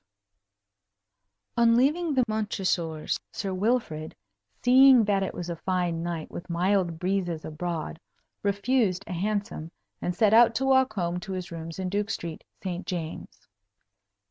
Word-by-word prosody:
V -, -, +3 dB
On 230 Hz, 0 st, +5 dB
leaving 300 Hz, +4 st, +2 dB
the 255 Hz, -, +4 dB
Montresors, 185 Hz, -7 st, -1 dB
Sir 195 Hz, -2 st, -3 dB
Wilfrid, 185 Hz, -7 st, -1 dB, 0.5 s
seeing 260 Hz, -1 st, +7 dB
that 200 Hz, -1 st, +2 dB
it 190 Hz, -, -3 dB
was 175 Hz, -, -5 dB
a 170 Hz, -, -3 dB
fine 175 Hz, -1 st, -1 dB
night 170 Hz, -2 st, -4 dB
with 175 Hz, -, -8 dB
mild 175 Hz, 0 st, +1 dB
breezes 180 Hz, -2 st, -1 dB
abroad, 160 Hz, 0 st, -4 dB, 0.4 s
refused 200 Hz, -1 st, +1 dB
a -, -, -6 dB
hansom, 200 Hz, -3 st, -2 dB, 0.3 s
and 180 Hz, -, -2 dB
set 215 Hz, +2 st, +3 dB
out 230 Hz, 0 st, +6 dB
to 270 Hz, -, 0 dB
walk 265 Hz, -3 st, +4 dB
home 175 Hz, -3 st, -1 dB
to 190 Hz, +2 st, -6 dB
his 180 Hz, -2 st, -5 dB
rooms 165 Hz, 0 st, -7 dB
in 190 Hz, -1 st, -2 dB
Duke 205 Hz, +2 st, -1 dB
Street, 170 Hz, -6 st, -5 dB, 0.2 s
St. 180 Hz, -1 st, -3 dB
James's. 165 Hz, -3 st, -6 dB
190 Hz, 145 wpm, -27 LUFS, 170-220 Hz, 0.5 s, seeing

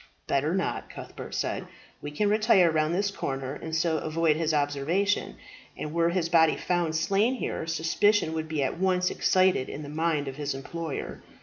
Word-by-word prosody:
"Better 150 Hz, +5 st, 0 dB
not," 190 Hz, -, -2 dB
Cuthbert -, -, -8 dB
said. -, -, -2 dB, 0.3 s
"We 145 Hz, -, -5 dB
can 150 Hz, +8 st, 0 dB
retire 205 Hz, -5 st, +4 dB
round 155 Hz, +1 st, +1 dB
this 200 Hz, +1 st, 0 dB
corner 135 Hz, -7 st, -4 dB
and 160 Hz, +2 st, -5 dB
so 160 Hz, -1 st, +1 dB
avoid 160 Hz, 0 st, +1 dB
his 160 Hz, 0 st, 0 dB
observation; 150 Hz, +7 st, 0 dB, 0.4 s
and 150 Hz, -, -5 dB
were 170 Hz, 0 st, +2 dB
his 170 Hz, -1 st, 0 dB
body 165 Hz, -2 st, +4 dB
found 175 Hz, -3 st, -1 dB
slain 200 Hz, +10 st, +2 dB
here, 165 Hz, -9 st, -4 dB
suspicion 165 Hz, +3 st, +2 dB
would 160 Hz, 0 st, -3 dB
be 155 Hz, -3 st, -1 dB
at 135 Hz, +5 st, -2 dB
once 185 Hz, -1 st, +2 dB
excited 185 Hz, -8 st, +2 dB
in 150 Hz, -, -6 dB
the 145 Hz, -, -8 dB
mind 155 Hz, -1 st, 0 dB
of 135 Hz, 0 st, -6 dB
his 145 Hz, -2 st, -2 dB
employer. 160 Hz, +2 st, -5 dB
160 Hz, 180 wpm, -27 LUFS, 150-180 Hz, 0.4 s, retire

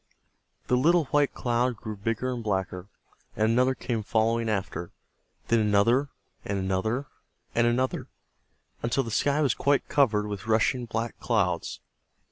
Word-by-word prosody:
The 125 Hz, -, +2 dB
little 165 Hz, +5 st, +4 dB
white 145 Hz, -1 st, +3 dB
cloud, 120 Hz, 0 st, 0 dB
grew 110 Hz, -1 st, -6 dB
bigger 115 Hz, +5 st, -2 dB
and 120 Hz, -2 st, -5 dB
blacker, 95 Hz, -2 st, -2 dB, 0.5 s
and 110 Hz, +1 st, +2 dB
another 130 Hz, +2 st, +3 dB
came 115 Hz, -4 st, -2 dB
following 115 Hz, +2 st, +1 dB
after, 95 Hz, -4 st, -3 dB, 0.6 s
then 115 Hz, -, +4 dB
another, 110 Hz, +6 st, +3 dB, 0.3 s
and 100 Hz, -, -2 dB
another, 95 Hz, +8 st, -1 dB, 0.5 s
and 120 Hz, 0 st, +3 dB
another, 125 Hz, +2 st, 0 dB, 0.7 s
until 120 Hz, +3 st, +1 dB
the 115 Hz, -, -6 dB
sky 145 Hz, +7 st, +2 dB
was 135 Hz, -, +3 dB
quite 140 Hz, 0 st, +1 dB
covered 110 Hz, -7 st, +3 dB
with 105 Hz, 0 st, -6 dB
rushing 115 Hz, +3 st, +2 dB
black 115 Hz, 0 st, -4 dB
clouds. 95 Hz, -8 st, 0 dB
115 Hz, 140 wpm, -27 LUFS, 105-125 Hz, 0.7 s, little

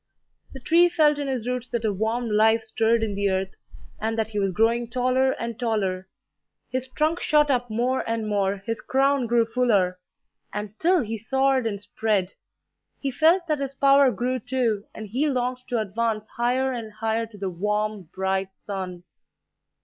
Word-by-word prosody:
The 270 Hz, -, -8 dB
tree 335 Hz, +7 st, +4 dB
felt 305 Hz, -4 st, +3 dB
in 285 Hz, -, -2 dB
his 250 Hz, -4 st, -2 dB
roots 250 Hz, 0 st, -3 dB
that 235 Hz, -2 st, -2 dB
a 210 Hz, -, +1 dB
warm 225 Hz, +4 st, -1 dB
life 220 Hz, +1 st, +3 dB
stirred 225 Hz, +1 st, +1 dB
in 215 Hz, -2 st, -1 dB
the 200 Hz, 0 st, 0 dB
earth, 190 Hz, 0 st, -2 dB, 0.4 s
and 225 Hz, +1 st, -2 dB
that 220 Hz, -1 st, 0 dB
he 210 Hz, -, -2 dB
was 195 Hz, -1 st, +1 dB
growing 230 Hz, +5 st, +2 dB
taller 255 Hz, +2 st, +2 dB
and 235 Hz, -1 st, -5 dB
taller; 195 Hz, -6 st, -1 dB, 0.6 s
his 255 Hz, 0 st, -2 dB
trunk 310 Hz, +6 st, 0 dB
shot 295 Hz, -1 st, +3 dB
up 245 Hz, -2 st, 0 dB
more 245 Hz, +4 st, 0 dB
and 225 Hz, -1 st, -1 dB
more, 200 Hz, -1 st, 0 dB
his 230 Hz, 0 st, -3 dB
crown 270 Hz, -1 st, +2 dB
grew 235 Hz, 0 st, +3 dB
fuller; 210 Hz, -7 st, +1 dB, 0.5 s
and 210 Hz, 0 st, -4 dB
still 345 Hz, -, +2 dB
he 225 Hz, 0 st, -4 dB
soared 265 Hz, +2 st, +1 dB
and 200 Hz, -2 st, -3 dB
spread. 205 Hz, -2 st, -1 dB, 0.7 s
He 275 Hz, -, -2 dB
felt 330 Hz, +7 st, +3 dB
that 305 Hz, -3 st, 0 dB
his 275 Hz, -1 st, -3 dB
power 275 Hz, 0 st, +5 dB
grew, 255 Hz, +1 st, -1 dB
too, 230 Hz, -4 st, -1 dB
and 220 Hz, -, -6 dB
he 260 Hz, +9 st, 0 dB
longed 250 Hz, -1 st, -1 dB
to 245 Hz, -, -1 dB
advance 215 Hz, +1 st, -1 dB
higher 255 Hz, +3 st, +1 dB
and 225 Hz, -3 st, -6 dB
higher 225 Hz, +1 st, -1 dB
to 220 Hz, -2 st, -14 dB
the 195 Hz, -1 st, -3 dB
warm, 210 Hz, 0 st, -2 dB
bright 190 Hz, 0 st, -1 dB
sun. 185 Hz, -3 st, -6 dB
230 Hz, 180 wpm, -25 LUFS, 210-260 Hz, 0.7 s, power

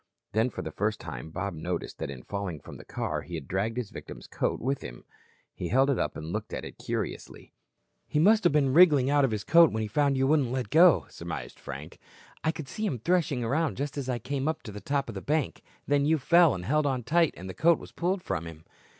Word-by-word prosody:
Then 110 Hz, +4 st, +2 dB
for -, -, -6 dB
the -, -, -5 dB
first 105 Hz, +1 st, -1 dB
time -, -, -7 dB
Bob 95 Hz, +4 st, -3 dB
noticed 85 Hz, +2 st, -4 dB
that -, -, -3 dB
in 65 Hz, -2 st, -8 dB
falling 100 Hz, -6 st, -4 dB
from -, -, -11 dB
the -, -, -11 dB
car -, -, -3 dB
he 90 Hz, -, -7 dB
had 80 Hz, -4 st, -6 dB
dragged 105 Hz, +5 st, -1 dB
his 120 Hz, -5 st, -3 dB
victim's -, -, -9 dB
coat -, -, -2 dB
with 135 Hz, +3 st, -1 dB
him. -, -, -9 dB, 0.5 s
He -, -, -4 dB
held 135 Hz, +3 st, +3 dB
it 135 Hz, -, 0 dB
up -, -, -1 dB
and 80 Hz, +2 st, -6 dB
looked 105 Hz, 0 st, -4 dB
at -, -, -4 dB
it -, -, -10 dB
curiously. -, -, -5 dB, 0.5 s
"He -, -, -2 dB
must 210 Hz, +8 st, +5 dB
have 175 Hz, -, +4 dB
been 140 Hz, -3 st, +2 dB
wriggling 150 Hz, -5 st, +6 dB
out 145 Hz, -1 st, +4 dB
of 135 Hz, -, +3 dB
his 105 Hz, -2 st, -3 dB
coat 165 Hz, +4 st, +6 dB
when 110 Hz, -, -2 dB
he -, -, -2 dB
found 140 Hz, +5 st, +1 dB
you 135 Hz, -, +2 dB
wouldn't 140 Hz, -4 st, +2 dB
let 130 Hz, -1 st, -3 dB
go," 160 Hz, -, +6 dB
surmised -, -, -7 dB
Frank. 70 Hz, +4 st, -8 dB, 0.4 s
"I 160 Hz, -, +2 dB
could 155 Hz, -4 st, -8 dB
see 215 Hz, +10 st, -3 dB
him 135 Hz, -, -2 dB
threshing 150 Hz, -2 st, +1 dB
around 145 Hz, +6 st, 0 dB
just 140 Hz, +2 st, -3 dB
as 135 Hz, -3 st, -4 dB
I 125 Hz, -, 0 dB
came 135 Hz, +4 st, -3 dB
up 160 Hz, 0 st, -2 dB
to 110 Hz, -, -7 dB
the 105 Hz, 0 st, -8 dB
top 140 Hz, -1 st, -1 dB
of 115 Hz, -, -6 dB
the 95 Hz, -, -6 dB
bank. 150 Hz, +4 st, -1 dB, 0.2 s
Then 145 Hz, 0 st, +2 dB
you 160 Hz, +1 st, +4 dB
fell 170 Hz, -, +5 dB
and 90 Hz, -1 st, -6 dB
held 150 Hz, +5 st, +2 dB
on 130 Hz, -3 st, -1 dB
tight 165 Hz, +6 st, +2 dB
and 95 Hz, -, -8 dB
the 95 Hz, -, -6 dB
coat 170 Hz, -, +4 dB
was -, -, -12 dB
pulled 180 Hz, +1 st, -1 dB
from 85 Hz, +1 st, -3 dB
him." 80 Hz, -1 st, -10 dB
130 Hz, 250 wpm, -28 LUFS, 100-150 Hz, 0.5 s, wriggling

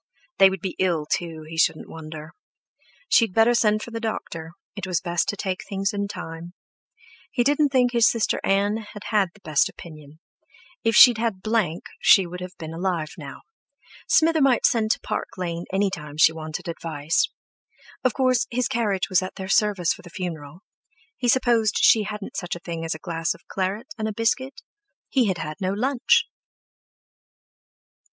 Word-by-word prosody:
They 195 Hz, 0 st, +8 dB
would 190 Hz, -2 st, -5 dB
be 185 Hz, -1 st, -4 dB
ill 170 Hz, -5 st, +1 dB
too, 160 Hz, 0 st, -3 dB
he 160 Hz, +1 st, -5 dB
shouldn't 160 Hz, -1 st, +1 dB
wonder. 155 Hz, 0 st, -9 dB, 0.7 s
She 230 Hz, -, +5 dB
had 190 Hz, -, -12 dB
better 225 Hz, +2 st, +5 dB
send 215 Hz, -2 st, +2 dB
for 235 Hz, -, -9 dB
the 230 Hz, -, -4 dB
doctor; 170 Hz, -7 st, -5 dB, 0.2 s
it 200 Hz, -3 st, -5 dB
was 180 Hz, -3 st, 0 dB
best 175 Hz, -2 st, -1 dB
to -, -, -1 dB
take 185 Hz, -1 st, -3 dB
things 195 Hz, 0 st, -2 dB
in 200 Hz, 0 st, -2 dB
time. 165 Hz, -3 st, -8 dB, 0.8 s
He 245 Hz, -, +1 dB
didn't 290 Hz, +2 st, +3 dB
think 250 Hz, -2 st, +3 dB
his 235 Hz, -1 st, +5 dB
sister 230 Hz, -3 st, 0 dB
Ann 200 Hz, +2 st, +2 dB
had 210 Hz, -1 st, -10 dB
had 205 Hz, -4 st, +3 dB
the 210 Hz, -, -20 dB
best 155 Hz, -5 st, +2 dB
opinion; 155 Hz, -2 st, -13 dB, 0.6 s
if 225 Hz, -1 st, +2 dB
she'd 240 Hz, -1 st, +8 dB
had 220 Hz, -5 st, -2 dB
Blank 215 Hz, -7 st, 0 dB, 0.2 s
she 195 Hz, -, +6 dB
would 180 Hz, +1 st, -7 dB
have 180 Hz, 0 st, -8 dB
been 160 Hz, 0 st, -7 dB
alive 170 Hz, -3 st, -2 dB
now. -, -, -10 dB, 0.6 s
Smither 320 Hz, -1 st, +4 dB
might 270 Hz, -3 st, +3 dB
send 220 Hz, -2 st, +2 dB
to -, -, +1 dB
Park -, -, -4 dB
Lane 170 Hz, -2 st, -4 dB
any 195 Hz, +1 st, +1 dB
time 150 Hz, -3 st, -7 dB
she 160 Hz, 0 st, +6 dB
wanted 155 Hz, 0 st, -6 dB
advice. 160 Hz, -2 st, -1 dB, 0.7 s
Of 255 Hz, -, +1 dB
course, 255 Hz, -3 st, +2 dB
his 250 Hz, +1 st, 0 dB
carriage 220 Hz, -7 st, 0 dB
was 185 Hz, -1 st, +2 dB
at 185 Hz, -, -6 dB
their 190 Hz, 0 st, -6 dB
service 200 Hz, -5 st, +2 dB
for -, -, -13 dB
the 175 Hz, -, -13 dB
funeral. 170 Hz, -3 st, -6 dB, 0.5 s
He 245 Hz, -, -2 dB
supposed 235 Hz, -4 st, +3 dB
she 215 Hz, -2 st, +5 dB
hadn't 210 Hz, -1 st, -6 dB
such 175 Hz, -2 st, -3 dB
a -, -, -8 dB
thing 170 Hz, -1 st, -6 dB
as 165 Hz, -1 st, -2 dB
a 160 Hz, -, -13 dB
glass 165 Hz, -1 st, -1 dB
of -, -, -21 dB
claret 195 Hz, +5 st, -2 dB
and 220 Hz, -, -1 dB
a 215 Hz, -, -3 dB
biscuit—he 265 Hz, -, -2 dB
had 190 Hz, -3 st, 0 dB
had 155 Hz, 0 st, -6 dB
no 185 Hz, 0 st, 0 dB
lunch! 270 Hz, -, +2 dB
195 Hz, 180 wpm, -24 LUFS, 165-225 Hz, 0.8 s, They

